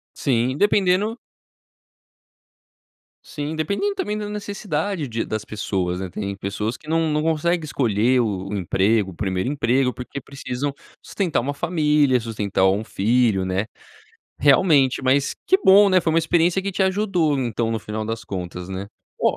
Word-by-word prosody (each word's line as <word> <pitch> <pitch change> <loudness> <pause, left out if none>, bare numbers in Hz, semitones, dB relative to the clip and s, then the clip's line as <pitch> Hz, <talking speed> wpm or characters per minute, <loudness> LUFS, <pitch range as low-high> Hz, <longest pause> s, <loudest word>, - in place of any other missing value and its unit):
Sim, 130 0 0
dependendo 205 +3 +2 2.1
Sim, 150 +1 -5
dependendo 200 - -1
também 210 - -2
da 210 -1 -4
necessidade 200 -5 -3
de 115 -1 -3
das 110 -1 -3
pessoas, 95 -4 -2
né, 95 -1 -4
tem 100 +1 -4
pessoas 105 +4 -3
que 150 - -19
não 165 0 +1
não 150 0 0
conseguem 165 +2 0
escolher 125 -2 +2
o 100 -4 -2
o 105 - -3
emprego 95 +2 +1
o - - -12
1º 95 +4 -2
emprego, 130 -2 +1
porque 125 +2 -7
precisam 140 0 -4 0.3
sustentar 180 - -1
uma 140 +4 -3
família, 150 -5 +2
sustentar 105 -4 -1
um 100 +3 0
filho, 110 -2 +1
né. 95 +3 -1 0.7
Realmente, 140 -2 +4
mas 135 +2 +2
que 380 - +5
bom, 200 +2 +7
né, 185 -1 +5
foi 165 - 0
uma 165 - +3
experiência 170 +3 +2
que 200 0 -3
te 190 - 0
ajudou 185 -6 +1
então, 115 -2 -1
no 115 - -1
final 110 +1 -5
das 115 0 -4
contas, 90 -1 -6
né? 95 +1 -5 0.3
Ó - - +2
130 Hz, 160 wpm, -22 LUFS, 105-165 Hz, 2.1 s, bom